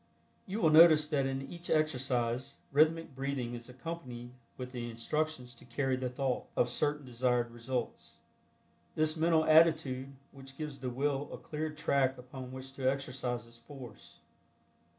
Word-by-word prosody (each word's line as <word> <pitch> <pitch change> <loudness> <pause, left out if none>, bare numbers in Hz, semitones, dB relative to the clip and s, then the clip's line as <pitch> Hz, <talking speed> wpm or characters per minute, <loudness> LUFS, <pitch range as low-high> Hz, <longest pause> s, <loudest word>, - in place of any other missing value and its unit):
You 200 +3 -3
will 160 - +5
notice 155 -1 +8
that 140 -3 +1
in 135 0 -2
each 170 0 -7
exercise 130 -4 0 0.2
rhythmic 155 0 +3
breathing 135 -3 -2
is 120 0 -7
accompanied 125 -4 -7 0.3
with 125 -1 -6
the 120 -2 -4
instructions 125 +2 -2
to 120 - -14
"carry 130 +2 0
the 130 0 -2
thought" 130 0 -1
of 125 - +3
certain 145 +3 0
desired 125 -1 0
results. 120 +1 -4 0.8
This 155 0 +2
mental 160 0 +3
attitude 155 -5 +4 0.4
gives 150 -3 -5
the 130 -1 -3
Will 140 +3 -1
a - - -6
cleared 155 0 -5
track 135 -3 +2
upon 125 0 -9
which 130 +1 -8
to 130 -1 +1
exercise 125 -4 -3
its 115 0 -12
force. 125 -3 -12
135 Hz, 150 wpm, -32 LUFS, 125-155 Hz, 0.8 s, notice